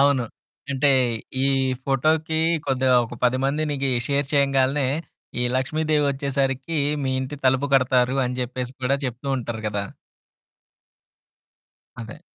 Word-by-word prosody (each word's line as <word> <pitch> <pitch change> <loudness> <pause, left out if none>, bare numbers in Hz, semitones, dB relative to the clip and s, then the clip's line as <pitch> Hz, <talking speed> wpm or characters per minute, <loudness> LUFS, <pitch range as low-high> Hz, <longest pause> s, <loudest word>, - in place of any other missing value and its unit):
అవును. 140 -3 +3 0.5
అంటే, 140 +1 +3 0.5
ఈ - - +3 0.4
ఫోటోకి 155 +4 +1 0.3
కొద్దిగా 130 -1 +2
ఒక 120 - -9
10 125 +1 +3
మందినికీ 140 -1 0 0.2
షేర్ 140 0 0
చెయ్యంగాలనే, 135 0 +2 0.5
ఈ - - +2
లక్ష్మీదేవి 150 +2 +1
ఒచ్చేసరికీ, 135 +2 -1 0.2
మీ 130 -1 0
ఇంటి 130 +3 -5
తలుపు 130 +2 +3
కొడతారు 130 0 +3
అని 125 +1 -3
జెప్పేసి 125 0 -4
కూడా 135 +2 +2
జెప్తూ 125 +2 -4
ఉంటారు 115 -2 -5
గదా! 100 -1 -2 2.2
అదే. 115 +7 -9
135 Hz, 115 wpm, -23 LUFS, 125-140 Hz, 2.2 s, అవును